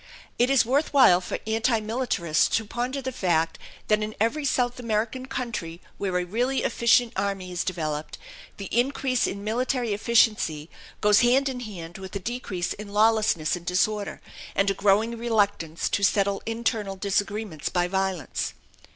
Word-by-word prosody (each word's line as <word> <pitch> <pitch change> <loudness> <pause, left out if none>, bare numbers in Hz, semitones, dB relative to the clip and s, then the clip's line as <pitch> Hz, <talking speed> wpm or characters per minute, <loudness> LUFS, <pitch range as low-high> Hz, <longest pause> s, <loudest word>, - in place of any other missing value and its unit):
It 245 +2 +4
is 270 -3 +4
worth 280 +6 +1
while 185 -10 +7
for - - -4
anti 225 +1 +1
militarists 215 -9 0
to 225 - -3
ponder 250 +5 -3
the 260 - -3
fact 165 -7 0 0.3
that 215 0 +3
in 215 0 -4
every 230 +8 +1
South 250 -2 0
American 230 +2 -2
country 220 -11 -4 0.2
where 190 -3 -1
a 180 - -1
really 245 +8 0
efficient 235 0 +3
army 195 -2 -2
is 175 0 -2
developed, 155 -4 -3 0.4
the 200 - -6
increase 255 +1 +1
in 200 +1 -5
military 240 +1 -1
efficiency 205 -8 +2 0.3
goes 210 0 +5
hand 255 +3 +4
in 255 -1 -5
hand 180 -7 -8
with 190 +1 -9
a - - -1
decrease 195 -5 -3
in 210 0 -9
lawlessness 210 -6 +2
and 175 0 -10
disorder, 205 +3 0 0.3
and 195 0 +3
a - - 0
growing 205 +4 +2
reluctance 205 -8 0
to - - 0
settle 200 0 +2
internal 225 -3 -1
disagreements 200 -3 -2
by 175 -1 +1
violence. 190 -4 -2
210 Hz, 160 wpm, -25 LUFS, 185-240 Hz, 0.4 s, while